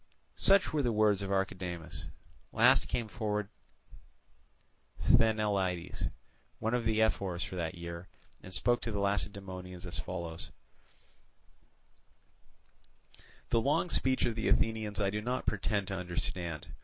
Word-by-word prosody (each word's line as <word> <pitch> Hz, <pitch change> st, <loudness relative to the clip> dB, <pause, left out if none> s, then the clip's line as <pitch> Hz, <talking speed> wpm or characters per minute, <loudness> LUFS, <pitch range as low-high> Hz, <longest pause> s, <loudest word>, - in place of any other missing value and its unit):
Such 195 Hz, -4 st, +5 dB
were 150 Hz, -, +2 dB
the 120 Hz, -3 st, +1 dB
words 105 Hz, -2 st, +3 dB
of 100 Hz, -, -3 dB
Archidamus. 90 Hz, -4 st, -2 dB, 0.5 s
Last -, -, +5 dB
came 115 Hz, -2 st, -1 dB
forward 105 Hz, -2 st, -2 dB, 1.5 s
Sthenelaidas, 105 Hz, -6 st, +2 dB, 0.5 s
one 110 Hz, +1 st, -1 dB
of 120 Hz, -2 st, +1 dB
the 110 Hz, 0 st, +3 dB
ephors 95 Hz, -5 st, 0 dB
for -, -, -6 dB
that 85 Hz, 0 st, -2 dB
year, 85 Hz, +1 st, -7 dB, 0.3 s
and 95 Hz, -, -10 dB
spoke 120 Hz, +5 st, +2 dB
to 115 Hz, -, -3 dB
the 105 Hz, -, -2 dB
Lacedaemonians 95 Hz, -2 st, -2 dB
as 85 Hz, -, -4 dB
follows: 85 Hz, -2 st, -5 dB, 3.0 s
"The 115 Hz, -, +3 dB
long 145 Hz, +7 st, +1 dB
speech 130 Hz, 0 st, +2 dB
of 120 Hz, -, 0 dB
the 110 Hz, -, -2 dB
Athenians 110 Hz, -2 st, +1 dB
I 100 Hz, -1 st, +2 dB
do 105 Hz, +1 st, -2 dB
not 125 Hz, +3 st, -2 dB
pretend 100 Hz, -1 st, 0 dB
to 95 Hz, -, -2 dB
understand. 85 Hz, -3 st, -3 dB
100 Hz, 130 wpm, -32 LUFS, 90-110 Hz, 3.0 s, Such